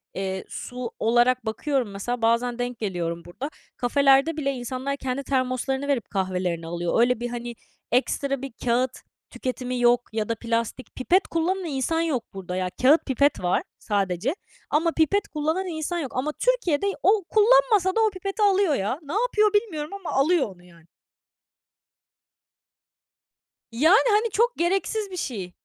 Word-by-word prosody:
Eee, 190 Hz, 0 st, -3 dB
su 250 Hz, -1 st, -6 dB
olarak 240 Hz, +2 st, +3 dB
bakıyorum 250 Hz, +1 st, -1 dB
mesela 230 Hz, +5 st, -4 dB
bazen 235 Hz, +2 st, +1 dB
denk 245 Hz, -1 st, -3 dB
geliyorum 170 Hz, -5 st, -3 dB
burada. 250 Hz, +11 st, -6 dB, 0.3 s
Kafelerde 275 Hz, +4 st, +3 dB
bile 275 Hz, -2 st, 0 dB
insanlar 260 Hz, +2 st, -4 dB
kendi 265 Hz, 0 st, -3 dB
termoslarını 265 Hz, +1 st, -1 dB
verip 270 Hz, -6 st, -1 dB
kahvelerini 180 Hz, -3 st, -2 dB
alıyor. 170 Hz, +3 st, -1 dB
Öyle, 250 Hz, 0 st, +3 dB
bir, 240 Hz, 0 st, -3 dB
hani, 240 Hz, 0 st, -5 dB, 0.4 s
ekstra 275 Hz, +2 st, 0 dB
bir 275 Hz, -1 st, -6 dB
kâğıt 245 Hz, +1 st, +2 dB, 0.4 s
tüketimi 250 Hz, 0 st, -4 dB
yok 240 Hz, 0 st, +4 dB
ya 220 Hz, -1 st, -2 dB
da 230 Hz, -, 0 dB
plastik. 230 Hz, +2 st, -3 dB
Pipet 360 Hz, +9 st, +2 dB
kullanan 360 Hz, +3 st, -1 dB
insan 315 Hz, +2 st, -1 dB
yok 295 Hz, -8 st, -1 dB
burada, 185 Hz, -2 st, -6 dB
ya. 185 Hz, 0 st, -1 dB
Kâğıt 285 Hz, +6 st, +5 dB
pipet 280 Hz, +2 st, +2 dB
var 175 Hz, -, +1 dB, 0.2 s
sadece 200 Hz, -, -1 dB, 0.3 s
ama 325 Hz, +3 st, +2 dB
pipet 330 Hz, +6 st, +1 dB
kullanan 315 Hz, +5 st, -1 dB
insan 335 Hz, +1 st, -3 dB
yok 275 Hz, -6 st, -4 dB
ama 280 Hz, +4 st, 0 dB
Türkiye'de 400 Hz, -10 st, +1 dB, 0.2 s
o 400 Hz, +1 st, +4 dB
kullanmasa 435 Hz, -4 st, +4 dB
da 450 Hz, -, +3 dB
o 440 Hz, -, +4 dB
pipeti 390 Hz, +2 st, -5 dB
alıyor, 390 Hz, -6 st, +3 dB
ya. 210 Hz, +7 st, -2 dB
Ne 290 Hz, +2 st, -7 dB
yapıyor 430 Hz, -2 st, +2 dB
bilmiyorum 330 Hz, -9 st, -1 dB
ama 395 Hz, -3 st, -6 dB
alıyor 285 Hz, 0 st, +3 dB
onu 175 Hz, -, -21 dB
yani. 170 Hz, -2 st, -19 dB, 2.9 s
Yani, 315 Hz, -, +5 dB
hani, 430 Hz, +3 st, +3 dB
çok 475 Hz, +4 st, +1 dB
gereksiz 390 Hz, +4 st, 0 dB
bir 365 Hz, -, -6 dB
şey. 200 Hz, -, -4 dB
265 Hz, 150 wpm, -25 LUFS, 230-340 Hz, 2.9 s, Kâğıt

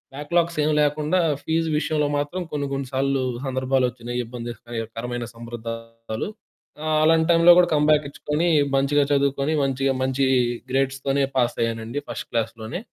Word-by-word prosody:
Backlogs 170 Hz, +3 st, 0 dB
ఏమి 155 Hz, -, +2 dB
లేకుండా 150 Hz, +4 st, +1 dB, 0.2 s
fees 165 Hz, 0 st, 0 dB
విషయంలో 150 Hz, -1 st, 0 dB
మాత్రం 145 Hz, +6 st, -2 dB
కొన్ని, 145 Hz, -1 st, -1 dB
కొన్ని 135 Hz, -1 st, -3 dB
సార్లు 135 Hz, 0 st, +1 dB, 0.2 s
సందర్భాలొచ్చినియి, 125 Hz, -2 st, -1 dB
ఇబ్బందికరమైన 120 Hz, 0 st, -5 dB
సందర్భాలు. 115 Hz, -, -6 dB, 0.5 s
ఆహ్, 155 Hz, 0 st, +1 dB
అలాంటి 160 Hz, 0 st, +4 dB
టైంలో 170 Hz, +1 st, +7 dB
గూడా 175 Hz, -, +4 dB
కమ్‌బ్యాకిచ్చుకొని, 150 Hz, +2 st, +1 dB, 0.3 s
మంచిగా 140 Hz, +1 st, +3 dB
చదువుకొని, 140 Hz, +2 st, +1 dB
మంచిగా 135 Hz, 0 st, +1 dB
మంచి 130 Hz, +1 st, +1 dB, 0.5 s
గ్రేడ్స్‌తోనే 135 Hz, +1 st, 0 dB
పాసయ్యానండి. 115 Hz, +1 st, -1 dB
ఫస్ట్ -, -, -5 dB
క్లాస్‌లోనే. 115 Hz, +5 st, -3 dB
135 Hz, 115 wpm, -23 LUFS, 120-150 Hz, 0.5 s, టైంలో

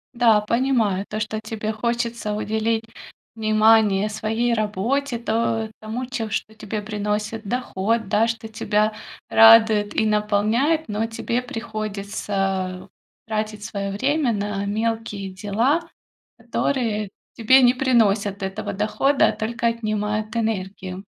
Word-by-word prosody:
Да, 230 Hz, -3 st, +5 dB
понимаю 220 Hz, -3 st, +1 dB
то, 215 Hz, -, -3 dB
что 215 Hz, 0 st, -3 dB
тебе 215 Hz, 0 st, -4 dB
хочется 235 Hz, -1 st, -2 dB
уделить 220 Hz, +1 st, -1 dB, 0.5 s
внимание 215 Hz, -2 st, +4 dB
своей 225 Hz, +3 st, -1 dB
работе, 235 Hz, +5 st, -1 dB
то 225 Hz, -1 st, -1 dB
тому, 225 Hz, +4 st, -4 dB
че 245 Hz, -3 st, -4 dB
что 215 Hz, +1 st, -3 dB
тебе 215 Hz, 0 st, -5 dB
приносит 210 Hz, +1 st, -3 dB
доход, 225 Hz, -1 st, -1 dB
да, 215 Hz, +4 st, +2 dB
что 225 Hz, -1 st, -4 dB
тебя 215 Hz, 0 st, 0 dB, 0.4 s
радует 220 Hz, -2 st, +6 dB
и 220 Hz, -, +1 dB
наполняет. 215 Hz, +9 st, +1 dB
Но, 215 Hz, +1 st, -1 dB
тебе 235 Hz, +2 st, -2 dB
приходится 200 Hz, -5 st, -3 dB, 0.4 s
тратить 215 Hz, -1 st, -3 dB
своё 200 Hz, -2 st, -4 dB
время 270 Hz, +5 st, +1 dB
на 205 Hz, -1 st, -2 dB
мелкие 215 Hz, -1 st, -2 dB
дела, 225 Hz, -, +1 dB, 0.6 s
которые 225 Hz, -6 st, -1 dB, 0.3 s
тебе 260 Hz, +4 st, +5 dB
не 245 Hz, 0 st, +6 dB
приносят 210 Hz, -6 st, +1 dB
этого 190 Hz, +3 st, -4 dB
дохода, 215 Hz, +8 st, +2 dB
а -, -, +1 dB
только 230 Hz, +2 st, -2 dB
отнимают 215 Hz, -1 st, -2 dB
энергию. 195 Hz, -4 st, -3 dB
215 Hz, 120 wpm, -22 LUFS, 210-230 Hz, 0.6 s, радует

